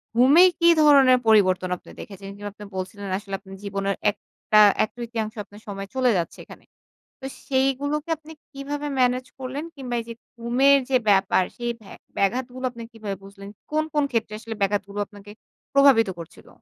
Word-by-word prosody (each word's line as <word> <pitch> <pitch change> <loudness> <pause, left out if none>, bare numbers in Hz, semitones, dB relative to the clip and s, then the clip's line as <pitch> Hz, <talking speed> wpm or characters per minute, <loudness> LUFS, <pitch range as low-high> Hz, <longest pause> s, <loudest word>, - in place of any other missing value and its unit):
ঘুমে 270 +9 +7 0.2
কি 340 - +4
ধরনের 275 -4 +6
পরিবর্তন 185 -4 +4
আপনি - - -16
দেখেছেন? 195 -1 -9
যেমন 205 0 -6
আপনি 210 - -12
বলছিলেন, 195 +2 -6
আসলে 200 -1 -10
আপনার 195 -1 -12
জীবনের 200 0 -2 0.2
একটা 215 +1 -1 0.2
১/৩ 225 -1 -4
আপনার 205 +2 -16
সময় 195 -1 -6
চলে 255 -2 +3
যাচ্ছে 170 - -3
এখানে। - - -14 0.6
তো - - -7 0.2
সেইগুলোকে 280 +4 0
আপনি 315 +1 -14 0.2
কিভাবে 290 +1 -5
ম্যানেজ 250 0 +2
করলেন, 265 +3 -5
কিংবা 255 -4 -5
এই 230 - -4
যে - - -5 0.3
ঘুমের 260 +4 +4
যে 260 - +4
ব্যাপার, 195 -1 +3
সেই 240 0 -2
ভ্যা 195 - -13 0.2
ব্যাঘাতগুলো 250 +5 -1
আপনি 235 -1 -9
কিভাবে 210 -3 -5
বুঝলেন? 200 0 -11 0.2
কোন, 310 0 +1
কোন 295 - +2
ক্ষেত্রে 225 -3 -1
আসলে 225 0 -7
ব্যাঘাতগুলো 200 0 -1
আপনাকে 205 0 -14 0.5
প্রভাবিত 265 -7 +6
করছিল? 165 - -12
230 Hz, 160 wpm, -24 LUFS, 200-265 Hz, 0.6 s, ঘুমে